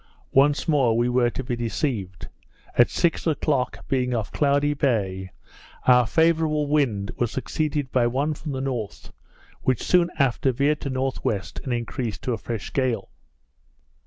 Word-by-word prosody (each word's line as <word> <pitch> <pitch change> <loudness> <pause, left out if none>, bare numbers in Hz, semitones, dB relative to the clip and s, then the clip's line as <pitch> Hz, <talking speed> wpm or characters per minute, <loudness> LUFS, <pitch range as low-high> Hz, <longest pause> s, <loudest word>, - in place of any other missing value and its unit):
Once 140 +2 +3
more 135 -8 +3
we 120 +1 +2
were 125 -1 +2
to 130 - -5
be 125 -1 -2
deceived; 115 - -3 0.5
at 120 - +5
six 170 -1 0
o'clock, 140 -4 -1
being 125 -2 0
off 110 -3 -3
Cloudy 145 0 +2
Bay, 100 -10 -1 0.6
our 125 -2 +5
favourable 160 -1 +2
wind 130 -10 0
was 120 -2 0
succeeded 145 0 -2
by 120 -2 +3
one 140 +6 0
from 150 0 -6
the 130 -1 -3
north, 125 -6 -5 0.5
which 130 -2 0
soon 175 -1 +3
after 135 -1 +2
veered 145 +4 +1
to 140 - -3
N.W., 130 -5 -1 0.3
and 130 - -3
increased 120 -2 -3
to 125 - -1
a 115 - -3
fresh 115 -4 -5
gale. 125 -7 0
130 Hz, 155 wpm, -24 LUFS, 120-145 Hz, 0.6 s, at